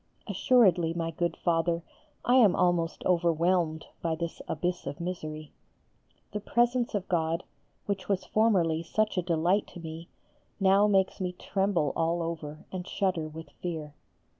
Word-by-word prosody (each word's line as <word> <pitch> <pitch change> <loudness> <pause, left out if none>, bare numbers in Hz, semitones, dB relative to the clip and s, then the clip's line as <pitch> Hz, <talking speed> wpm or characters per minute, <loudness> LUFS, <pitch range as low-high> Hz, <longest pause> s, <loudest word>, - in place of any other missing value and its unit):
Assuredly, 190 -6 +3
my 165 -1 -2
good 170 +1 -2
Father, 170 0 +1 0.4
I 245 - +3
am 215 -8 +6
almost 175 -2 +1
overwhelmed 170 -1 +2 0.2
by 165 -1 0
this 170 +1 -5
abyss 180 -3 -2
of 140 +1 -5
misery. 155 -4 -5 0.8
The 210 - -3
presence 240 +2 +1
of 195 -2 -2
God, 165 -1 0 0.4
which 200 -1 -3
was 195 -2 0
formerly 185 -8 +2
such 215 +6 0
a 180 - +2
delight 175 +4 +1
to - - -7
me, 165 +1 -8 0.5
now 195 +1 +5
makes 195 -1 +2
me 180 -1 -1
tremble 190 -5 0
all 165 +1 +1
over 155 -2 -5
and 185 0 -5
shudder 180 -5 0
with 160 +1 -10
fear. 160 -4 -4
175 Hz, 145 wpm, -29 LUFS, 165-195 Hz, 0.8 s, am